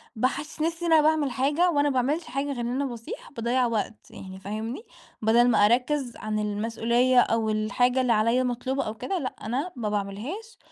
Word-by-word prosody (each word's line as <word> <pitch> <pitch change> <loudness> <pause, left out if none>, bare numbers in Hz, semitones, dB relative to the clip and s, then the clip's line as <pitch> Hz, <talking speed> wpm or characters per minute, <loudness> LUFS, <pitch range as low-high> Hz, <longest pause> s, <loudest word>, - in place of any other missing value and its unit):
باحسِّس 290 +7 -2
نفسي 335 +2 -1
إن 330 - +3
أنا 310 - +7
باعمل 305 -3 +2
حاجة 290 +8 +2
وأنا 290 -1 +2
ما - - -1
باعملش 300 +7 -1
حاجة 275 +2 -3
غير 275 -4 -4
إن 235 - -2
أنا 265 +3 -1
باصيح، 235 +1 -7
باضيّع 245 0 0
وقت 225 -1 -3
يعني 190 0 -10
فاهمني، 220 - -5 0.4
بَدَل 235 +3 +4
ما 205 -3 +5
أركّز 250 +2 +1
عن 215 0 -3
المسؤولية 230 +4 +2
أو 225 -2 +2
الحاجة 245 +4 +1
اللي 245 -2 +3
عليَّ 230 +4 +2
مطلوبة 255 +2 -1
أو 215 - -4
كده 370 - -3
لأ 255 - -4
أنا 270 +11 -2
ما 220 -4 -2
باعملهاش، 215 - -4
245 Hz, 190 wpm, -26 LUFS, 220-285 Hz, 0.4 s, أنا